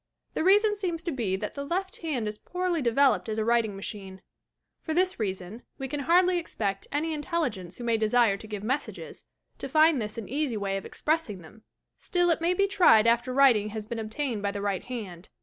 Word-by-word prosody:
The - - -1
reason 415 +3 +5
seems 350 -5 -3
to 340 - -2
be 225 -9 -1
that 210 +2 -4
the 280 - -5
left 375 +6 -3
hand 275 -10 -2
is 210 0 -5
poorly 360 -2 -2
developed 250 -1 +3
as 215 - -2
a 220 - 0
writing 230 -3 +2
machine. 195 -1 -7 0.6
For 315 - -3
this 370 -2 +1
reason, 195 +1 -4 0.2
we 270 - -4
can 290 +2 -4
hardly 355 +5 +3
expect 200 -12 -3
any 315 +3 -1
intelligence 295 - -3
who 245 - -7
may 230 -1 +1
desire 220 -1 +3
to 205 +2 -10
give 210 -2 -6
messages, 260 +6 -4 0.3
to - - -5
find 310 -4 +4
this 215 +1 -5
an 220 -4 -5
easy 275 -3 -1
way 195 -1 -2
o£ - - -15
expressing 300 - -2
them! 215 +7 -16 0.3
Still 350 -1 +1
it 330 - 0
may 345 +2 +2
be 395 - +3
tried 345 - +5
after 235 +2 +2
writ 265 -3 +6
ing 210 0 -3
has 215 0 -6
been 235 +1 -5
obtained 225 +1 -3
by 200 - 0
the 200 0 -4
right 200 -2 -2
hand. 205 -8 -7
240 Hz, 215 wpm, -27 LUFS, 210-320 Hz, 0.6 s, writ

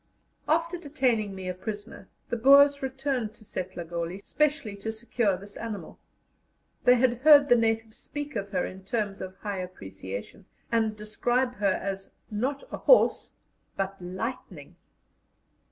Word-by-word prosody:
After 335 +2 +1
detaining 250 - 0
me 190 -1 -6
a 180 - -1
prisoner, 205 +1 -7 0.2
the - - -2
Boers 280 +4 +6
returned 265 -4 -2
to 220 - -15
Setlagoli 175 -2 -4
specially 285 -8 0
to 220 +3 -4
secure 220 -3 0
this 200 +2 -11
animal; 220 -3 -6 0.9
they 250 - +8
had 245 -1 +2
heard 290 0 +8
the 245 - +8
natives 225 0 0
speak 290 +1 -6
of 200 -2 -3
her 185 -3 0
in 190 +1 -8
terms 205 -1 -2
of 185 0 -6
high 200 -1 -4
appreciation, 100 - -7 0.3
and 220 -2 +2
describe 245 +4 0
her 200 -2 +1
as 195 0 -4 0.2
"not 260 +7 -1
a - - -4
horse, - - +4 0.4
but 195 0 -3
lightning." 190 +8 -6
220 Hz, 140 wpm, -28 LUFS, 195-260 Hz, 0.9 s, they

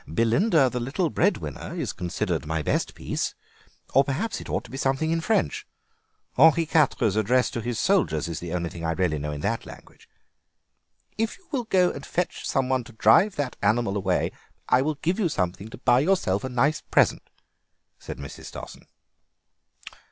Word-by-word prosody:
"'Belinda, 135 - +3
the 125 0 -2
little 145 +8 -1
Breadwinner,' 80 - -1
is - - -3
considered 90 -3 -2
my 80 0 -1
best - - -1
piece, - - -3 0.6
or, 135 - +6
perhaps, 150 +12 -2
it - - -10
ought - - -1
to - - -14
be 135 - -6
something 135 +4 0
in 165 0 +1
French. 220 +6 0 0.7
Henri 160 +1 +6
Quatre's 135 -9 +2
address 125 +4 +2
to 120 - -3
his 120 0 -3
soldiers 175 - +1
is 85 -1 -4
the 85 -1 -6
only 85 -1 -1
thing 85 - -8
I 80 0 0
really 80 -3 0
know 75 +1 -3
in 75 0 -5
that - - -1
language." - - -14 1.1
"If 225 0 -1
you 375 - -28
will 255 -6 -1
go 185 -4 +3
and 140 - -8
fetch 180 +4 -3
some 135 -2 +1
one 130 -1 +1
to 120 - -13
drive 110 - +4
that 140 -3 -3
animal 110 -3 +1
away 95 -2 0 0.4
I 125 - +4
will 155 +2 0
give 175 +8 -1
you 185 -6 +2
something 95 - -2
to - - -10
buy 120 +1 +3
yourself 145 - +1
a 130 - -3
nice 135 +5 +1
present," - - +1 0.7
said - - -8
Mrs. 70 -1 -9
Stossen. - - -10
125 Hz, 180 wpm, -25 LUFS, -, 1.1 s, or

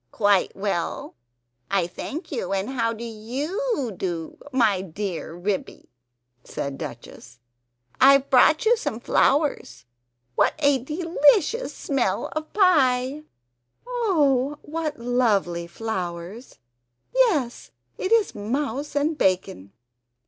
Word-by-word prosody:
"Quite 205 -3 +2
well, 195 -4 -3 0.6
I 195 -3 +2
thank 310 - -7
you, 215 -9 -3
and 195 +6 -2
how 230 -3 0
do 230 +1 -7
YOU 265 - -3
do, 170 -3 -4 0.2
my 225 -8 +2
dear 185 -2 -5
Ribby?" 190 +2 -4 0.5
said 140 -1 -5
Duchess. 120 +1 -9 0.6
"I've 275 0 +6
brought 310 - +5
you 470 +2 +5
some 245 - -3
flowers; 280 - +1 0.5
what - - +2
a 285 -3 +3
delicious 330 - +2
smell 255 -9 -1
of 310 0 -4
pie!" 290 -7 +3 0.6
"Oh, 295 - +1
what 310 0 -4
lovely 215 -8 0
flowers! 185 +2 -5 0.6
Yes, 360 - +1 0.3
it 375 - -2
is 455 -3 +3
mouse 270 +7 -3
and 295 +2 +1
bacon!" 185 - 0
250 Hz, 105 wpm, -24 LUFS, 195-300 Hz, 0.6 s, I've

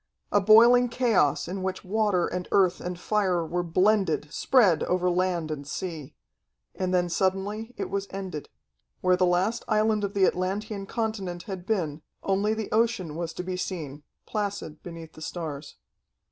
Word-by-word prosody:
A 205 - +4
boiling 235 +4 +7
chaos 225 - +2
in 190 +2 -4
which 190 +1 -3
water 205 -2 +1
and 180 0 -4
earth 185 -3 +3
and 180 0 -5
fire 185 -5 +1
were 175 +2 -1
blended, 175 -3 +1
spread 205 - +4
over 180 0 +1
land 175 -3 0
and 145 -2 -5
sea. 160 -5 -5 0.6
And 185 -1 -2
then 180 -1 +2
suddenly 195 +6 -1
it - - -3
was 200 0 -2
ended. 190 -6 -6 0.5
Where 185 0 +4
the 180 0 +2
last 185 +6 +1
island 215 -1 +2
of 200 0 -3
the 195 -1 +5
Atlantean 195 +3 -2
continent 200 -7 -3
had 190 -2 -7
been, 165 -8 -1 0.2
only 200 +3 +1
the 220 -1 -5
ocean 220 -8 +1
was 170 0 -3
to 180 - -5
be 185 0 -3
seen, 155 -6 -5 0.2
placid 200 -7 -4
beneath 165 -2 -9
the 155 - -13
stars. 155 -4 -6
185 Hz, 160 wpm, -27 LUFS, 175-210 Hz, 0.6 s, boiling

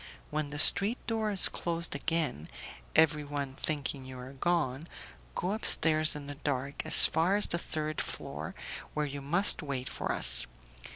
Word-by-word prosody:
When 150 -1 -4
the 150 - -8
street 200 - +4
door 220 -2 -3
is 200 -3 +5
closed 170 0 -4
again, 145 - -3 0.5
everyone 145 -3 0
thinking 140 -1 -3
you 130 0 -11
are 125 +2 -11
gone, 150 -1 -3 0.5
go 180 - -3
upstairs 155 -7 +3
in 145 -1 -9
the 145 - -8
dark 140 -1 -5
as - - +10
far 170 +5 0
as 205 - +2
the 170 - -2
third 155 -2 -5
floor, - - -8 0.4
where 150 0 -2
you 140 0 -8
must 175 +10 +3
wait 135 -4 -6
for - - -5
us. - - +3
150 Hz, 160 wpm, -28 LUFS, 140-170 Hz, 0.5 s, as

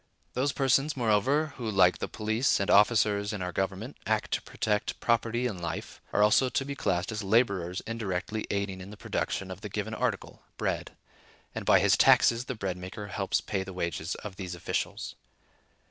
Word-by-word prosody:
Those 135 +3 +1
persons, 135 +2 +2
moreover, 130 +7 +2
who, 120 -4 -3
like 95 -3 +4
the - - -2
police 110 +4 +1
and 100 - +1
officers 105 -1 +4
of 100 - -4
our 90 - -3
government, 95 - -3
act 110 -1 0
to - - 0
protect 105 -1 -2
property 115 +1 +1
and 100 -8 -3
life, 85 - -5
are 105 - +3
also 110 +5 +4
to 135 - -1
be 140 - -4
classed 90 -7 -1
as 110 0 -3
laborers 100 -4 +1
indirectly 110 -1 -3
aiding 100 -2 -2
in 95 - -9
the 105 - -10
production - - -3
of - - -8
the - - -6
given - - -3
article, - - -2 0.2
bread - - -3 0.6
(and - - -6
by - - +7
his - - +4
taxes 115 +1 +5
the 130 - -4
bread 95 -4 -3
maker 95 +3 -7
helps 100 -1 0
pay 100 - -2
the 95 0 -8
wages 85 -1 -3
of 100 -3 -8
these 90 -2 -5
officials). 85 - -3
105 Hz, 185 wpm, -29 LUFS, 95-115 Hz, 0.6 s, by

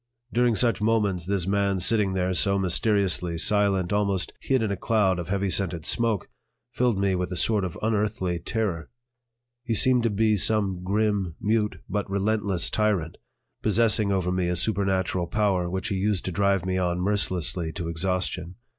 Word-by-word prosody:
During 120 -1 +2
such 115 -1 +1
moments 105 -5 +1
this 100 -3 0
man 100 0 0
sitting 100 0 +2
there 95 0 0
so 100 +2 +3
mysteriously 95 -2 0
silent, 100 0 +2
almost 100 -2 -1
hid 130 -3 0
in 105 - -1
a - - -1
cloud 95 -2 +1
of 85 - -5
heavy 100 0 -1
scented 85 -5 +1
smoke, 115 -4 0 0.4
filled 120 -4 0
me 100 -1 +1
with 90 0 -2
a - - -3
sort 105 +3 +2
of 90 -3 -5
unearthly 105 -5 -1
terror. 90 -4 -3 0.7
He 120 -3 -1
seemed 125 +2 +4
to 115 - +1
be 110 +1 +1
some 100 -2 +1
grim, 100 -3 -1
mute, 105 +1 -1
but 105 -2 -3
relentless 100 -2 0
tyrant, 100 -7 0 0.4
possessing 110 -1 +2
over 95 -2 0
me 90 -1 0
a 90 - -1
supernatural 95 -2 0
power 95 -2 0
which 95 +1 -3
he 100 - -2
used 100 -1 -1
to 95 - -2
drive 100 0 +1
me 95 0 -1
on 90 -1 -1
mercilessly 90 -4 0
to 85 - -5
exhaustion. 90 +1 -3
100 Hz, 170 wpm, -25 LUFS, 90-105 Hz, 0.7 s, seemed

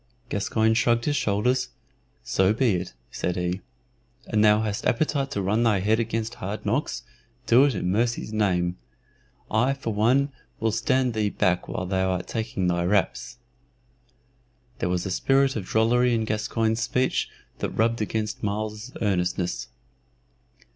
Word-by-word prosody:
Gascoyne 110 +2 +1
shrugged 115 +1 +2
his 145 - +1
shoulders. 125 +3 +1 0.5
"So 95 +2 +2
be 125 0 +2
it," 90 -6 -3 0.2
said 90 - -2
he. 90 +1 -2 0.6
"An 110 -2 +1
thou 105 0 +5
hast 105 -2 -2
appetite 140 +2 +1
to 115 -8 -2
run 105 +5 +1
thy 110 -4 +3
head 110 +3 +2
against 115 0 -2
hard 100 +3 -4
knocks, 130 +10 -1 0.4
do 125 +3 +6
it 140 -5 +1
i' 90 - -2
mercy's 110 +4 0
name! 90 -4 +1 0.7
I 125 +5 +2
for 115 -5 -4
one 130 +7 +3 0.3
will 110 0 +1
stand 130 +2 +1
thee 105 -1 +1
back 90 -2 0
while 90 - -3
thou 95 0 0
art 90 -1 -1
taking 110 -5 -2
thy 85 -1 +1
raps." 100 +6 0 1.4
There 90 - 0
was 90 0 -1
a 95 - -3
spirit 135 +6 +2
of 105 -5 -3
drollery 120 +2 +3
in 110 -1 0
Gascoyne's 110 +1 0
speech 125 +2 0 0.3
that - - -1
rubbed 115 +1 0
against 110 0 -2
Myles's 105 +3 -3
earnestness. 90 - -1
110 Hz, 150 wpm, -25 LUFS, 95-120 Hz, 1.4 s, do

